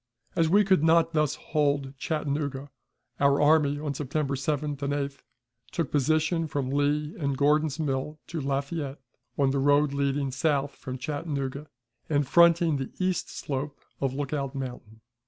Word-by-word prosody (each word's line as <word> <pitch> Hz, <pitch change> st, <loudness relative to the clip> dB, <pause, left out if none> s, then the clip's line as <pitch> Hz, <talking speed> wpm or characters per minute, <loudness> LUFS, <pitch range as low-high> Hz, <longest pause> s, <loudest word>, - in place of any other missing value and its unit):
As 165 Hz, -1 st, +3 dB
we 205 Hz, +4 st, +5 dB
could 190 Hz, -5 st, +3 dB
not 165 Hz, +1 st, +4 dB
thus 150 Hz, -1 st, +1 dB
hold 140 Hz, -3 st, 0 dB
Chattanooga, 145 Hz, -2 st, -2 dB, 0.5 s
our 140 Hz, 0 st, +4 dB
army, 145 Hz, -1 st, +4 dB
on 145 Hz, -1 st, -3 dB
September 140 Hz, +1 st, -2 dB
7th 145 Hz, +1 st, -2 dB
and 140 Hz, 0 st, -1 dB
8th, 140 Hz, -1 st, -3 dB, 0.5 s
took -, -, -2 dB
position 155 Hz, +3 st, +1 dB
from 140 Hz, -3 st, -2 dB
Lee 145 Hz, +2 st, 0 dB
and 140 Hz, -3 st, -1 dB
Gordon's 150 Hz, +1 st, +2 dB
Mill 150 Hz, 0 st, -2 dB
to 165 Hz, -2 st, -4 dB
Lafayette, 140 Hz, +1 st, -2 dB, 0.4 s
on 135 Hz, -2 st, +3 dB
the 140 Hz, -, 0 dB
road 145 Hz, +1 st, +3 dB
leading 140 Hz, -1 st, 0 dB
south 145 Hz, 0 st, 0 dB
from 130 Hz, -1 st, -7 dB
Chattanooga 145 Hz, 0 st, -4 dB, 0.4 s
and 145 Hz, -3 st, +1 dB
fronting 170 Hz, -1 st, +5 dB
the 135 Hz, -1 st, -4 dB
east 185 Hz, -1 st, -1 dB
slope 140 Hz, +1 st, -4 dB, 0.2 s
of 135 Hz, -1 st, -1 dB
Lookout 140 Hz, -1 st, -3 dB
Mountain. 125 Hz, -5 st, -7 dB
145 Hz, 150 wpm, -27 LUFS, 140-155 Hz, 0.5 s, we